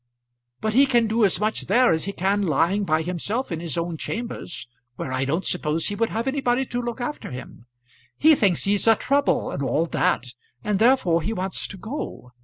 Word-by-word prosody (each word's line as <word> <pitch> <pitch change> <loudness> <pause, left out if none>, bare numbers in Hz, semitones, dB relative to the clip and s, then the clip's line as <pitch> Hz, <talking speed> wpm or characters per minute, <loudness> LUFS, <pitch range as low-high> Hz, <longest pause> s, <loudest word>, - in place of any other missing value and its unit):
"But 215 0 -1
he 275 +4 +5
can 240 -3 +3
do 225 +1 +1
as 195 - +3
much 215 +1 -1
there 250 -5 +4
as 160 - -1
he 200 - -2
can 200 +2 0
lying 190 +4 +1
by 155 -2 +1
himself 180 - -3
in 165 - -2
his 165 -4 -3
own 170 -1 -2
chambers, 230 - -5 0.3
where 130 - -5
I 130 +1 0
don't 160 +7 -1
suppose 160 -1 0
he 205 - -3
would 230 +2 0
have 230 +3 -3
anybody 265 -2 +1
to 245 -1 -3
look 240 0 -4
after 245 +5 -4
him. 125 -1 -10 0.5
He 315 +1 +6
thinks 200 - +2
he's 205 +2 +1
a 225 - +7
trouble 280 +5 +1
and - - -4
all 150 +4 +1
that, 125 -6 0 0.3
and 205 -2 0
therefore 220 -8 +3
he 215 +8 -2
wants 190 -2 -2
to 200 - -9
go. 220 - -6
200 Hz, 205 wpm, -24 LUFS, 165-235 Hz, 0.5 s, a